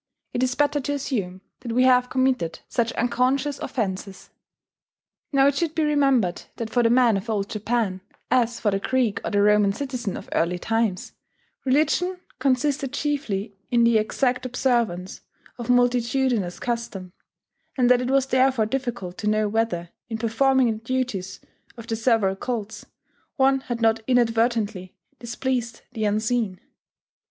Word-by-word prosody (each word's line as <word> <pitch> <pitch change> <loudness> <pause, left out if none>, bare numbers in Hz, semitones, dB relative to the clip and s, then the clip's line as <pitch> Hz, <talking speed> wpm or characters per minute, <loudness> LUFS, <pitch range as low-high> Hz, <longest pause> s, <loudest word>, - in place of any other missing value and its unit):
It 245 - -1
is 255 0 +1
better 290 +1 +2
to 285 +1 -2
assume 205 -10 -3 0.2
that 235 -2 -5
we 250 +2 +3
have 250 -1 +4
committed 255 -10 0
such 235 -1 0
unconscious 260 +4 0
offences." 195 -4 -4 1.0
Now 275 -1 +4
it 280 - +4
should 315 +2 -2
be 320 - +1
remembered 275 -11 +2
that 225 -1 -5
for 245 - +3
the 230 - +3
man 240 -3 +4
of 200 +4 -6
Old 205 -2 -1
Japan, 215 -3 -1 0.3
as 240 -2 +2
for 210 - +1
the 195 - 0
Greek 245 -1 0
or - - -2
the 205 -1 +2
Roman 210 -1 +4
citizen 250 -6 -4
of - - -10
early 175 +2 +1
times, 225 -1 -1 0.5
religion 315 +7 +1 0.2
consisted 270 +1 0
chiefly 235 -10 -2
in 240 -1 +3
the 235 -1 +5
exact 250 +3 0
observance 235 -8 -1 0.4
of 240 0 -6
multitudinous 245 -5 +1
custom; 230 -7 -4 0.6
and 250 -2 +3
that 250 0 +5
it 250 - -2
was 270 0 +3
therefore 260 -3 +2
difficult 240 -7 -4
to 210 - -3
know 215 0 +2
whether, 205 -6 -1 0.2
in 225 - -3
performing 245 +2 +2
the 220 0 -6
duties 230 -7 -3 0.4
of 230 - -9
the 230 -1 -2
several 225 -4 +2
cults, 220 0 -5 0.5
one 270 -1 +3
had 240 -3 -5
not 225 0 +3
inadvertently 225 -6 +1 0.2
displeased 240 0 -3
the 220 -3 -2
Unseen. 215 -1 0
235 Hz, 150 wpm, -24 LUFS, 215-260 Hz, 1.0 s, the